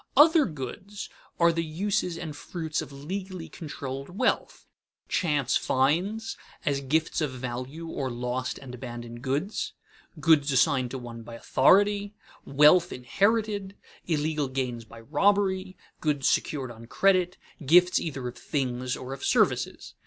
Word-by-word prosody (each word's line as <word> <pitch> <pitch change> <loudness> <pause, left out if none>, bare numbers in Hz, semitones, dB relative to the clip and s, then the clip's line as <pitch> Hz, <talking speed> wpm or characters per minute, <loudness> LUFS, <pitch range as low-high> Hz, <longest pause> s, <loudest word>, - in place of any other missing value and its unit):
Other 315 +1 +7
goods 175 +7 -7 0.3
are 170 0 +6
the 165 0 0
uses 180 +2 -1
and 160 -3 -6
fruits 160 -1 -3
of - - -8
legally 180 +5 -6
controlled 140 -3 -6
wealth: - - 0 0.4
chance 145 -7 +1
finds, 180 +12 0 0.3
as 140 -1 +1
gifts 155 +5 0
of 150 - +1
value 130 +5 -5
or 135 -4 -3
lost 125 +1 -3
and 130 -2 -10
abandoned 120 -1 -7
goods; 140 - -2 0.5
goods 155 -3 +4
assigned 135 -1 +3
to 130 - -5
one 120 -2 -8
by 115 +1 -9
authority; 200 - +3 0.3
wealth 150 +6 +5
inherited; 200 - 0 0.3
illegal 155 -2 0
gains 125 -3 -3
by 115 +1 -13
robbery; 190 - +1 0.2
goods 145 -4 +1
secured 135 -5 0
on 115 0 -12
credit; 185 +3 +2 0.3
gifts 180 +5 +5
either 135 -6 -4
of 125 - -8
things 125 -3 -2
or 130 +1 -6
of 135 - -8
services. - - +1
150 Hz, 135 wpm, -27 LUFS, 130-185 Hz, 0.5 s, Other